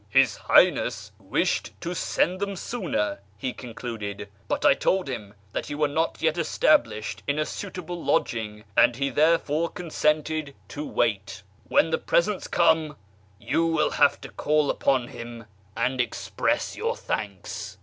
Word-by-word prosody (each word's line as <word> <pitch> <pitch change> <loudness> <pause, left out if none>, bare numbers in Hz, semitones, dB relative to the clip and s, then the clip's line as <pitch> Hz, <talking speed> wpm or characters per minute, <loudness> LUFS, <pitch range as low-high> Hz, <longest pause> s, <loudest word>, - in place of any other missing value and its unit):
" - - -32
His - - +4
Highness - - +3
wished - - -1
to 170 +1 -3
send 180 +1 0
them 200 0 -2
sooner," 175 - -2 0.2
he 125 +5 -3
concluded, 110 -4 -6
" 100 +1 -32
but - - -1
I - - +8
told 190 -3 +1
him 105 -6 -6 0.2
that - - -4
you 145 - -4
were 150 0 +3
not 160 +3 -1
yet 160 +1 +2
established 110 -9 +2
in 145 +1 +1
a 155 - +1
suitable 175 -3 -6
lodging, 110 -6 -1
and 120 - +5
he 140 +2 -1
therefore 160 +2 +2
consented 155 -3 -1
to 145 - -5
wait. 105 -5 -1 0.2
When 165 - +3
the - - +1
presents 195 +2 +1
come, 160 -3 +2 0.4
you 165 0 +1
will 165 -2 +2
have 145 -1 +4
to - - -8
call 150 -1 +1
upon 130 -3 +1
him 120 -1 -8 0.3
and 125 +2 +1
express 120 - -1
your - - -1
thanks." 100 -4 -5
145 Hz, 155 wpm, -26 LUFS, 115-165 Hz, 0.4 s, I